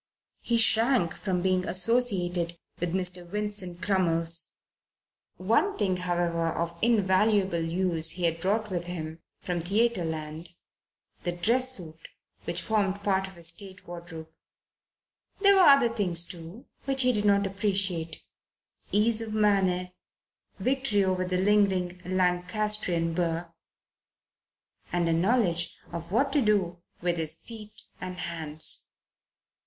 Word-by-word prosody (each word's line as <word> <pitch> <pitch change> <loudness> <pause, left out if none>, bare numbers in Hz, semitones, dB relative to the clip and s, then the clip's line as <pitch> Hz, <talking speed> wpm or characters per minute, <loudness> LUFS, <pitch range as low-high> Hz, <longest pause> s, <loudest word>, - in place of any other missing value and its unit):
He 235 - 0
shrank 225 -5 +4
from 180 -3 -2
being 185 -1 +1
associated 180 -5 +3 0.2
with 175 +1 -2
Mr. 180 -1 -2
Vincent 190 -1 -4
Crummles. 170 -4 -1 0.8
One 225 - +1
thing, 190 -4 0
however, 175 -2 -1
of 170 +1 -3
invaluable 200 -4 +2
use 165 -1 0
he 180 - -5
had 165 -1 0
brought 210 +3 0
with 175 -2 -2
him 165 -2 -6 0.2
from 180 -1 -2
Theatreland 170 -5 -1 0.7
the 175 - -2
dress 250 +9 +3
suit 160 -3 -11 0.4
which 170 0 -1
formed 200 -1 0
part 190 -1 +1
of 190 - -13
his 170 -1 +3
stage 185 +2 -1
wardrobe. 170 -2 -9 1.1
There 400 0 +6
were 375 -5 +7
other 275 -4 +6
things, 180 -6 +1
too, 175 +6 -10 0.2
which 270 -1 +3
he 250 0 +3
did 210 -2 -1
not 200 0 +3
appreciate 190 -5 -2 0.7
ease 220 +3 +2
of 220 -1 -5
manner, 190 -4 +2 0.7
victory 260 -6 +1
over 185 -1 0
the 180 0 -1
lingering 190 -2 +1
Lancastrian 180 -1 0
burr, 170 0 -2 1.4
and 175 0 0
a 165 - +2
knowledge 175 -2 +1 0.2
of 170 0 -7
what 270 +6 +1
to 290 - +3
do 190 -6 +1 0.2
with 175 0 0
his 160 -2 -2
feet 215 -2 -7 0.2
and 180 0 -6
hands. 160 -3 -1
185 Hz, 125 wpm, -27 LUFS, 170-210 Hz, 1.4 s, were